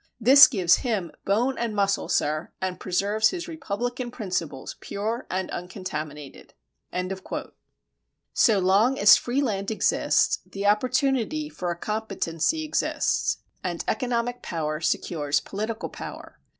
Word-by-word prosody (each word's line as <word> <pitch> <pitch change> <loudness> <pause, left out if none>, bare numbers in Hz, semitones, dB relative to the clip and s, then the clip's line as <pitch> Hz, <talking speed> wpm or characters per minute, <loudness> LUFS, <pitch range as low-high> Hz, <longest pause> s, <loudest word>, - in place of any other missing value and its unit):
This 270 +5 +9
gives 185 -8 +3
him 210 -9 -2
bone 240 +7 +1
and 230 -2 -2
muscle, 200 -1 +1
sir, 155 +2 0
and 185 -1 -3
preserves 205 +4 +1
his 355 -1 -5
republican 245 -4 -4
principles 180 - -4
pure 220 +5 -4
and 185 0 -2
uncontaminated. 155 -6 -7 1.8
So 225 -6 +4
long 200 +8 +3
as 205 +1 +8
free 260 +4 0
land 200 -5 -2
exists, 220 - +2
the 200 +1 -6
opportunity 260 +6 +1
for 180 -11 -4
a 170 - -3
competency 210 - -1
exists, 305 - 0 0.2
and 175 -3 -3
economic 245 -1 -1
power 155 -2 -3
secures 145 -4 0
political 215 +3 -4
power. - - -9
205 Hz, 120 wpm, -25 LUFS, 180-245 Hz, 1.8 s, This